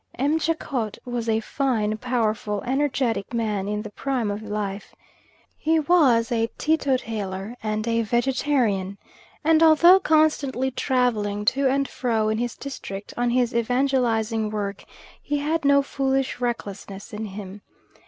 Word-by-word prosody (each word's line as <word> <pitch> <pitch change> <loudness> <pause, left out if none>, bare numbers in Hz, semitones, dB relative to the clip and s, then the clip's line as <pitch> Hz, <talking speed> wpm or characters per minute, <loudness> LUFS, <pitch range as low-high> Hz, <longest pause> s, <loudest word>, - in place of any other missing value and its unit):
M. 290 +5 +1
Jacot 280 -9 -2
was 240 -2 -3
a 220 0 +2
fine, 220 -4 0
powerful, 220 -3 -1
energetic 255 -4 0
man, 210 -4 -1
in 210 0 -2
the 215 - -8
prime 245 -2 -2
of 205 +1 -4
life. 210 -2 -5 0.6
He 320 +1 +2
was 280 -9 +3
a 230 -1 +1
teetotaler 225 -9 -1
and 215 +1 -2
a 230 0 +2
vegetarian; 235 -4 0 0.5
and 320 +1 +4
although 330 +4 +7
constantly 300 -6 +2
travelling 220 -6 0
to 275 0 +1
and 275 +1 +1
fro 225 -4 0
in 220 0 0
his 240 0 -2
district 205 -8 -7
on 245 0 0
his 245 0 +1
evangelising 235 -3 +1
work, 205 -2 -4 0.4
he 290 - -2
had 310 +3 -1
no 280 0 +5
foolish 270 -1 -1
recklessness 205 -5 -5
in 215 +1 -4
him. 200 0 -8
240 Hz, 135 wpm, -24 LUFS, 215-275 Hz, 0.6 s, although